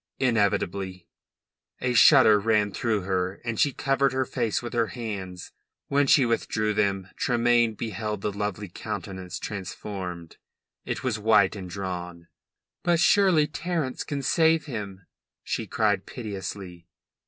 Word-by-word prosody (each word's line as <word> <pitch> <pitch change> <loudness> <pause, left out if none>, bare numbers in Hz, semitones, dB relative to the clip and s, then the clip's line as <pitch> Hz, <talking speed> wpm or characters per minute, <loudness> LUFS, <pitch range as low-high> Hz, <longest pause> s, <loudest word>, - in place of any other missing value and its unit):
"Inevitably." 100 -6 0 0.7
A 125 -1 0
shudder 120 -4 +7
ran 105 -1 +2
through 110 0 -1
her, 95 0 -1
and 115 -2 -3
she 145 - +4
covered 135 +1 +1
her 130 0 0
face 120 -4 -1
with 120 0 -7
her 115 -2 +1
hands. 100 -7 -6 0.4
When 140 0 +2
she 135 -1 +5
withdrew 110 -2 0
then 100 -2 0
Tremayne 120 -2 +2
beheld 105 -1 -4
the 105 - -1
lovely 105 0 -3
countenance 95 +1 -6
transformed. 95 -3 -6 0.5
It - - -4
was 120 -5 -1
white 105 -2 +4
and 95 -3 -7
drawn. 90 -2 -6 0.5
"But 175 -1 +2
surely 185 -4 +4
Terence 155 -3 -3
can 140 -3 -4
save 160 +3 +3
him!" 100 - -6 0.4
she - - -3
cried - - 0
piteously. 95 -5 -7
105 Hz, 130 wpm, -26 LUFS, 95-125 Hz, 0.7 s, shudder